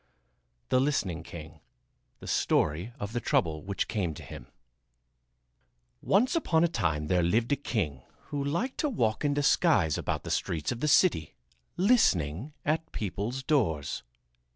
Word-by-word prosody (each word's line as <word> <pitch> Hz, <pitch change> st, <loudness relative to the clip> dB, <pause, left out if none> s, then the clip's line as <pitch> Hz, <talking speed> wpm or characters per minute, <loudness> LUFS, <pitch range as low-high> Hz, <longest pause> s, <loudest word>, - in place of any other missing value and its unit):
THE 130 Hz, -, +3 dB
LISTENING 100 Hz, -, 0 dB
KING 80 Hz, -1 st, -10 dB, 0.6 s
The -, -, -9 dB
Story 85 Hz, +9 st, +1 dB
of 105 Hz, 0 st, -5 dB
the 120 Hz, -, 0 dB
Trouble 80 Hz, -8 st, 0 dB
Which 100 Hz, 0 st, -2 dB
Came 90 Hz, -8 st, -2 dB
to -, -, -9 dB
Him -, -, -10 dB, 1.5 s
Once 240 Hz, -, +2 dB
upon 170 Hz, -, +2 dB
a -, -, +5 dB
time 80 Hz, -, -1 dB
there 90 Hz, +3 st, +2 dB
lived 110 Hz, +9 st, +1 dB
a -, -, +5 dB
king 90 Hz, -, -2 dB, 0.3 s
who 145 Hz, -1 st, -2 dB
liked 170 Hz, -, -2 dB
to 300 Hz, -, +1 dB
walk 115 Hz, -, 0 dB
in 145 Hz, -1 st, +1 dB
disguise 145 Hz, -, +3 dB
about -, -, -2 dB
the -, -, -5 dB
streets 80 Hz, -2 st, -1 dB
of 120 Hz, -, -4 dB
the 150 Hz, -, 0 dB
city, 145 Hz, -, +3 dB, 0.4 s
listening 130 Hz, -, +2 dB
at 160 Hz, +1 st, -1 dB
people's 110 Hz, +6 st, -3 dB
doors. 100 Hz, -, 0 dB
115 Hz, 150 wpm, -29 LUFS, -, 1.5 s, a